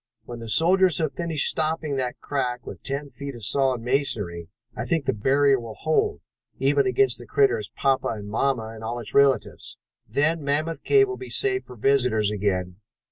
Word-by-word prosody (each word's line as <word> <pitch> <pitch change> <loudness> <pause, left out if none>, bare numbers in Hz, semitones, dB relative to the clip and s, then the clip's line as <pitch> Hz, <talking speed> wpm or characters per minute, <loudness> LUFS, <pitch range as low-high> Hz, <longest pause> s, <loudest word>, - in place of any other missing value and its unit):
When 120 0 -8
the 115 -1 -7
soldiers 180 - +4
have 155 -3 -1
finished 165 -4 +1
stopping 155 -2 0
that 125 -2 -3
crack 125 -4 -3
with - - -9
ten 140 +1 -4
feet 140 -1 -7
of 115 -4 -6
solid 130 -1 +2
masonry, 110 - -1 0.3
I - - -3
think 165 -5 -1
the - - +1
barrier 135 +5 +2
will 115 -2 -8
hold, 155 0 0 0.4
even 140 0 +2
against 130 0 +2
that 120 - -11
critter's 120 -5 +1
papa 135 -1 0
and 105 -2 -5
mamma 110 0 -1
and 110 0 -10
all 115 +2 -3
its 115 -3 -6
relatives. 140 -1 +1 0.3
Then 150 +6 +1
Mammoth 155 +3 -1
Cave 405 -1 +4
will 390 - -5
be 385 - -9
safe 390 -1 0
for - - -12
visitors 120 -4 +2
again. 90 -3 -2
135 Hz, 185 wpm, -24 LUFS, 115-145 Hz, 0.4 s, soldiers